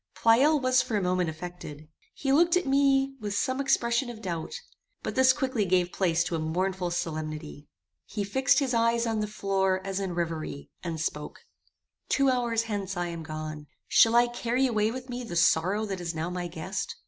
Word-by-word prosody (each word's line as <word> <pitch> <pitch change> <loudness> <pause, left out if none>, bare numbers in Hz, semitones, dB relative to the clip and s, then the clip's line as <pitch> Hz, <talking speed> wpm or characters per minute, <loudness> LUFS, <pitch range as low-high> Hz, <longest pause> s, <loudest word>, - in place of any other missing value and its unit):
Pleyel 270 +7 +4
was 255 -1 +3
for 220 - -2
a - - 0
moment 180 -1 +1
affected. 160 -2 -8 0.3
He 270 -1 0
looked 340 +4 +5
at 360 - -1
me 275 0 +3
with 205 -2 -4
some 260 +5 0
expression 240 -2 +1
of 235 -2 -8
doubt; 180 - -4 0.5
but - - -3
this 260 0 +5
quickly 260 -4 -1
gave 180 -1 +1
place 170 -3 +1
to 170 - -3
a - - -1
mournful 180 +3 -1
solemnity. 155 -3 -5 0.4
He 210 - -3
fixed 260 +7 +2
his 270 -3 +1
eyes 230 0 +2
on 225 -1 -1
the 210 - -1
floor 195 -2 0
as 195 0 -2
in 190 -3 -3
reverie, 165 -4 -4
and 165 -3 -4
spoke: 150 - -4 0.7
"Two 275 -1 +3
hours 235 -2 0
hence 200 -4 -4
I 175 0 -1
am 170 -1 -6
gone. 155 -1 -6 0.2
Shall 225 +1 +5
I 240 0 +6
carry 240 +2 0
away 215 -4 +1
with 255 +2 -6
me 245 0 -5
the 200 -7 -6
sorrow 185 +5 +3
that 195 -3 -4
is 170 -1 -4
now 160 +2 -3
my 180 -1 -3
guest? 165 -2 -5
200 Hz, 195 wpm, -28 LUFS, 170-245 Hz, 0.7 s, I